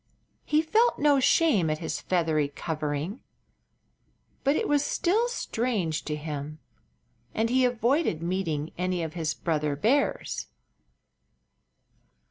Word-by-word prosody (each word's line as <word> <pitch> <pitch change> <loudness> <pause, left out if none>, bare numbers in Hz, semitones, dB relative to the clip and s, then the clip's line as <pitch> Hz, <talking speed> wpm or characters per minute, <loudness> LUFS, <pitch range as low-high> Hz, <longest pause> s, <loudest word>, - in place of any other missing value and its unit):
He 305 +1 +2
felt 450 +9 +3
no 290 -2 +4
shame 250 - +3
at 155 - 0
his 160 - -4
feathery 160 -5 +1
covering, 155 - -4 1.2
but 280 +2 +3
it - - 0
was 290 -1 +2
still 420 +11 +1
strange 225 - -2
to 150 - -2
him, 150 0 -5 0.8
and 225 +2 +1
he 260 0 +4
avoided 245 - +1
meeting 165 -4 -2
any 180 -1 0
of 160 -1 -5
his 160 -3 -2
brother 150 -3 -1
bears. 240 - 0
180 Hz, 115 wpm, -27 LUFS, -, 1.2 s, no